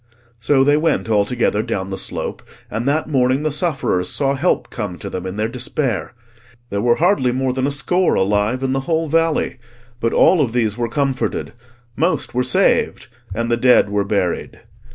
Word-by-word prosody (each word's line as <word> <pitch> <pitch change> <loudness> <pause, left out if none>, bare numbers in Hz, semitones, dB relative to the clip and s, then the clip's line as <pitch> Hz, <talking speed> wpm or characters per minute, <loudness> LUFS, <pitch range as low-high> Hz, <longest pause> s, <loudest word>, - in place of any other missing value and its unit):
So 135 +3 +3
they 145 +2 +4
went 155 -6 0
all 105 -2 +3
together 115 -2 0
down 95 -4 -3
the - - -2
slope, - - -4 0.3
and 115 +4 -3
that 150 +2 +1
morning 130 -1 +1
the 155 - 0
sufferers 140 - 0
saw 140 -1 0
help 150 +7 0
come 105 -7 -5
to - - -7
them 95 0 -4
in 95 - -5
their 105 +1 -1
despair. 125 -2 -3 0.6
There 100 0 -1
were 120 +1 +3
hardly 165 -8 +2
more 130 0 -1
than 130 +1 0
a - - -1
score 175 +7 +1
alive 105 +6 +1
in 130 0 0
the 135 - 0
whole 165 0 +1
valley; 165 -4 +1 0.4
but 115 0 0
all 180 -4 +4
of 120 -5 0
these 110 -4 +1
were 120 -1 -2
comforted, 135 0 -2 0.4
most 170 +5 0
were 125 - +1
saved, 125 0 +1 0.3
and 115 +1 -2
the 120 - +2
dead 125 -4 +4
were 100 0 +1
buried. 100 -2 -2
125 Hz, 190 wpm, -19 LUFS, 110-145 Hz, 0.6 s, they